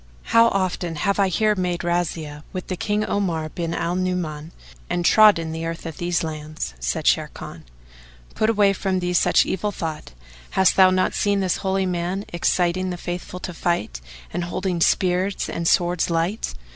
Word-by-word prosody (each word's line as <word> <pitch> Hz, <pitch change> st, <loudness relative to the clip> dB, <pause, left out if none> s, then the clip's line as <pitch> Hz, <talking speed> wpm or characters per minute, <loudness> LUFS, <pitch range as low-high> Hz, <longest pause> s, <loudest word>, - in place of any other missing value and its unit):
How 230 Hz, 0 st, +7 dB
often 185 Hz, -4 st, -1 dB
have 200 Hz, +7 st, 0 dB
I 195 Hz, -, +4 dB
here 215 Hz, +4 st, +2 dB
made 180 Hz, -3 st, -2 dB
razzias 165 Hz, -4 st, -2 dB
with 185 Hz, -1 st, -5 dB
King 210 Hz, +1 st, 0 dB
Omar 170 Hz, -6 st, -1 dB
bin 170 Hz, +1 st, -3 dB
al 170 Hz, +1 st, -1 dB
Nu'uman 175 Hz, -4 st, -2 dB, 0.4 s
and 175 Hz, 0 st, -1 dB
trodden 200 Hz, -7 st, +5 dB
the 160 Hz, 0 st, -4 dB
earth 165 Hz, +1 st, -6 dB
of 165 Hz, -2 st, -6 dB
these 175 Hz, -1 st, 0 dB
lands!" 155 Hz, -, -5 dB
Said -, -, -2 dB
Sharrkan, -, -, -1 dB, 0.7 s
"Put 220 Hz, -, +1 dB
away 205 Hz, -3 st, +4 dB
from 190 Hz, -1 st, -1 dB
thee 180 Hz, 0 st, -2 dB
such -, -, +4 dB
evil 205 Hz, +3 st, -2 dB
thought, 160 Hz, -, -6 dB, 0.4 s
hast 190 Hz, -2 st, +5 dB
thou 190 Hz, -1 st, +7 dB
not 185 Hz, 0 st, +1 dB
seen 205 Hz, -1 st, +1 dB
this 185 Hz, -2 st, 0 dB
Holy 190 Hz, -1 st, 0 dB
Man 180 Hz, +2 st, -2 dB
exciting 180 Hz, +1 st, +1 dB
the 180 Hz, -, -4 dB
Faithful 175 Hz, +1 st, -6 dB
to 180 Hz, -, -5 dB
fight, 165 Hz, -, -2 dB, 0.3 s
and 175 Hz, 0 st, -2 dB
holding 180 Hz, 0 st, -2 dB
spears 185 Hz, +3 st, +1 dB
and 170 Hz, 0 st, -3 dB
swords 175 Hz, 0 st, +2 dB
light? 170 Hz, -, -1 dB
180 Hz, 170 wpm, -22 LUFS, 165-190 Hz, 0.7 s, How